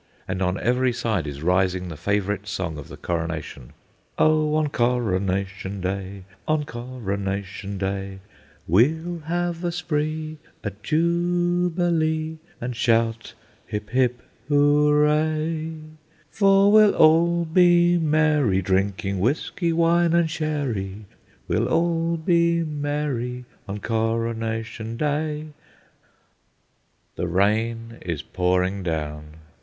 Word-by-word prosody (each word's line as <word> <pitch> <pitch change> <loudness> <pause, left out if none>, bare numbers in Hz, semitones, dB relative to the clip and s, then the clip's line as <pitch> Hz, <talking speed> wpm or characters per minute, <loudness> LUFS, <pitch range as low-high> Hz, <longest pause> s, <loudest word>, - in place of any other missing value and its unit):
And 95 - -3
on 90 +1 0
every 125 +1 +2
side 110 -9 -1
is 70 +1 -6
rising 90 +1 +1
the 80 - -6
favourite 100 +4 -1
song 90 -6 -3
of 70 - -9
the - - -10
Coronation:— 80 -7 -4 0.4
"Oh! 155 -1 +3
on 155 -1 +1
Coronation 100 -5 -1
Day, 95 +1 -4 0.2
on 155 -1 +1
Coronation 100 -6 -4
Day, 95 0 -3 0.5
We'll 160 - +2
have 175 0 -1
a 175 - 0
spree, 155 -2 -3 0.2
a 105 - -2
jubilee, 170 - 0 0.2
and 120 0 -4
shout, 115 0 +1 0.3
Hip, 105 0 -5
hip, 125 -1 +1 0.3
hooray, 150 +2 +2 0.6
For 195 0 +4
we'll 215 -1 +6
all 170 +2 +4
be 175 +1 +4
merry, 150 - +2
drinking 95 +1 0
whisky, 160 - 0
wine, 170 0 +3
and 170 -1 +3
sherry, 135 - -3 0.4
We'll - - +1
all 165 0 +1
be 170 0 +2
merry 145 -5 -3 0.2
on 100 +1 -5
Coronation 115 0 -2
Day." 150 +2 -2 1.7
The 90 - -1
rain 115 +5 0
is 85 -5 -4
pouring 90 +2 0
down. 75 -3 -4
125 Hz, 105 wpm, -23 LUFS, 100-160 Hz, 1.7 s, we'll